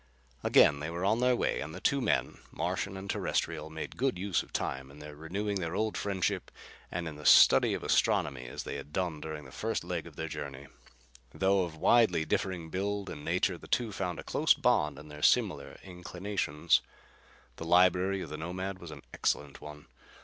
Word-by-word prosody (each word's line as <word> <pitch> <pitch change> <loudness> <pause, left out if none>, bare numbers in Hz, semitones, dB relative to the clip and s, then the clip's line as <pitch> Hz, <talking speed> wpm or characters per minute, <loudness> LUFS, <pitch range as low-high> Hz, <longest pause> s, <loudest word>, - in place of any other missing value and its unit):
Again 70 -1 +5
they 75 +2 -4
were 85 +2 -3
on 110 +4 +2
their 125 0 +3
way - - 0
and 80 +3 -6
the - - -7
two 140 +7 +1
men, - - 0
Martian 95 0 -2
and 95 +1 -7
Terrestrial, 80 -5 -2
made 80 0 -7
good 130 -5 0
use 95 0 0
of - - -13
the - - +1
time 65 0 -4
in 70 - -14
renewing 80 +8 -4
their 85 0 -3
old 110 +1 0
friendship 95 -3 -1 0.4
and 90 -1 -3
in 75 -2 -7
the 75 - -10
study - - +7
of - - -6
astronomy 65 -3 +1
as - - -6
they - - -5
had 75 - -9
done 85 -5 -2
during 80 -2 -6
the 65 - -12
first 110 +11 -2
leg 85 -2 -4
of 80 - -13
their 80 - -4
journey. 70 -2 -6 0.7
Though 95 -1 +3
of 80 -2 -9
widely 90 -2 +4
differing 85 -2 -2
build 100 +2 -2
and 75 - -8
nature, 90 +2 0
the - - -13
two 120 -3 0
found 90 -3 -3
a - - -7
close - - +3
bond 75 0 +2
in 75 - -11
their 75 0 -10
similar - - +2
inclinations. 90 -5 -1 0.8
The 80 - -6
library 90 +2 +4
of 75 - -9
the 75 - -4
Nomad 95 +4 -4
was 85 - -9
an 80 - -10
excellent 70 -1 -1
one. 75 0 -10
85 Hz, 200 wpm, -30 LUFS, 75-95 Hz, 0.8 s, study